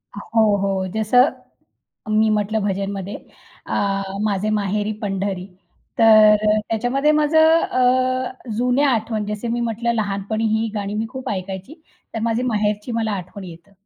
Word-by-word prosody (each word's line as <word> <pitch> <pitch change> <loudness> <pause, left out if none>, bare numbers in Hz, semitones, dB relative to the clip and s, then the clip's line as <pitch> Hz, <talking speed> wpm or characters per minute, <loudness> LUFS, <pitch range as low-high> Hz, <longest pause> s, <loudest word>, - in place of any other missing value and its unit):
हो, 215 0 +1
हो. 195 -1 -1
जसं 245 +5 +4 0.9
मी 220 0 +4
म्हटलं 215 +1 0
भजनमध्ये 195 0 -3 0.5
अ, 195 -1 -1 0.2
माझे 210 0 0
माहेरी 210 0 -1
पंढरी. 195 -2 -3 0.5
तर 215 -1 +7
अ, 215 0 +3
त्याच्यामध्ये 245 +7 +1
माझं 315 +2 +4
अ, 255 -1 0
जुन्या 250 +4 +2
आठवण 220 -2 -1
जसं 210 +3 -4
मी 240 - -1
म्हटलं 235 0 -1
लहानपणी 210 0 -2
ही 225 +1 -1
गाणी 205 -1 -3
मी 220 +1 -2
खूप 260 0 -6
ऐकायची 195 - -6 0.3
तर - - -2
माझी 230 +1 0
माहेरची 210 -1 -1
मला 225 -2 -1
आठवण 190 +1 -6
येतं. 170 +2 -13
215 Hz, 140 wpm, -21 LUFS, 200-240 Hz, 0.9 s, तर